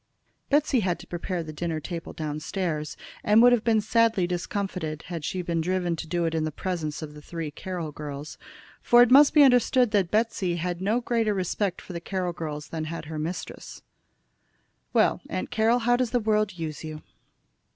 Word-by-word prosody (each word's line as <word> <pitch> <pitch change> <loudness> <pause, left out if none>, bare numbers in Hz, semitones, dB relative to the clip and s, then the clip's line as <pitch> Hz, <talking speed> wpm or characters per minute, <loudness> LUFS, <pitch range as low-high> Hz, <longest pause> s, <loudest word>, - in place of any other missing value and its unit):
Betsey 290 -2 +3
had 185 -5 0
to - - -12
prepare 175 0 -3
the 155 -1 -8
dinner 160 0 -2
table 165 +2 -6
down 150 -1 -4
stairs, 155 -3 -3 0.3
and 210 +2 +5
would 245 - +8
have 240 -3 +3
been 225 -2 +3
sadly 225 -3 +2
discomfited 175 -3 -3
had 170 -3 -6
she 180 +5 -2
been 170 -1 -1
driven 180 0 0
to 165 - -6
do 170 +1 0
it 165 - -1
in 160 -1 0
the 155 - -2
presence 160 -3 -3
of 150 -1 -9
three 165 -2 -5
Carroll 175 -1 -5
girls. 145 0 -7 0.4
For 240 0 +7
it 245 - +1
must 280 +2 +8
be 295 - +9
understood 250 -2 +4
that 195 -5 +2
Betsey 210 -5 0
had 175 +1 -3
no 215 +6 +1
greater 230 -3 +1
respect 185 0 -1
for 185 - -10
the 170 - -5
Carroll 180 -1 -2
girls 155 -3 -6
than 160 -1 -4
her 160 -1 -5
mistress. 165 +4 -6 1.1
"Well, - - +3
Aunt - - -3
Carroll, 225 +2 +3
how 245 0 +2
does 250 -2 0
the 245 - +1
world 215 -3 +1
use 160 -2 -5
you?" 155 -1 -7
180 Hz, 190 wpm, -26 LUFS, 160-215 Hz, 1.1 s, be